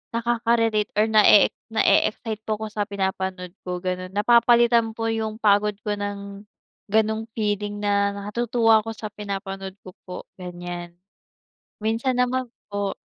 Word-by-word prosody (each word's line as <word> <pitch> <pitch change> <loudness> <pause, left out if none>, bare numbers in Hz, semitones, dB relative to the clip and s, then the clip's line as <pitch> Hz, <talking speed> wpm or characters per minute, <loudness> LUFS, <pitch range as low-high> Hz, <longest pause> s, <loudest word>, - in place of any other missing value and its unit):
nakaka-relate 230 -2 +1
or 210 - +5
na-e-ex 215 -2 +6 0.2
na-e-excite 220 0 +1
po 215 - +1
ko 220 - -4
sa 210 - -3
pinapanood 190 -2 -3
ko, 180 0 -3
ganon. 185 0 -3
Napapalitan 235 +1 +4
po 225 - -2
yung 220 -1 -2
pagod 210 -1 +3
ko 210 - 0
ng 200 0 -6 0.5
ganong 220 +1 +1
feeling 205 -1 -1
na 200 -1 +1
natutuwa 225 +2 +2
ako 225 - -7
sa 215 - -5
pinapanood 195 -1 -6
ko 185 - -10
po, 180 - -7 0.2
ganyan. 175 -1 -7 0.8
Minsan 230 +4 0
naman 250 0 0 0.2
po 205 -1 -2
210 Hz, 135 wpm, -24 LUFS, 200-225 Hz, 0.8 s, na-e-ex